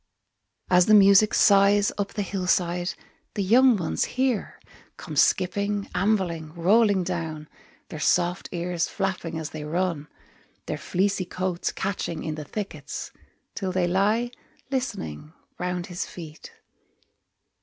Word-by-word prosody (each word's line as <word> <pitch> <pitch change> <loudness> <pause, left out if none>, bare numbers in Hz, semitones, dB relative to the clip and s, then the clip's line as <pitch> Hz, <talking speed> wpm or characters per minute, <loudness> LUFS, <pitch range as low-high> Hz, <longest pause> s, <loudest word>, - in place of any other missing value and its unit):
As 180 0 +5
the 215 - +7
music 200 +1 +7
sighs 200 0 +5
up 200 -1 -3
the 205 - -2
hill 190 -1 -4
side, 175 0 +1 0.4
The 200 - 0
young 240 +4 +5
ones 170 -4 -1
hear, 255 -5 -1 0.4
Come - - -8
skipping, 200 +2 +1
ambling, 180 -5 0
rolling 200 +2 +3
down, 165 -4 -4 0.4
Their 155 - -7
soft 175 +4 +1
ears 175 -1 -1
flapping 185 -4 -3
as 160 -2 -5
they 155 -1 -6
run, 165 -1 -2 0.6
Their - - -4
fleecy 190 0 0
coats 180 0 -2
catching 185 -4 -3
in 155 - -3
the 155 -1 -7
thickets, 205 +6 -6 0.4
Till 190 -3 -3
they 185 -1 +1
lie, 210 +7 +1 0.4
listening, 155 - -4 0.3
round 180 -1 -2
his 180 -1 -5
feet. 160 -3 -10
185 Hz, 130 wpm, -25 LUFS, 170-200 Hz, 0.6 s, the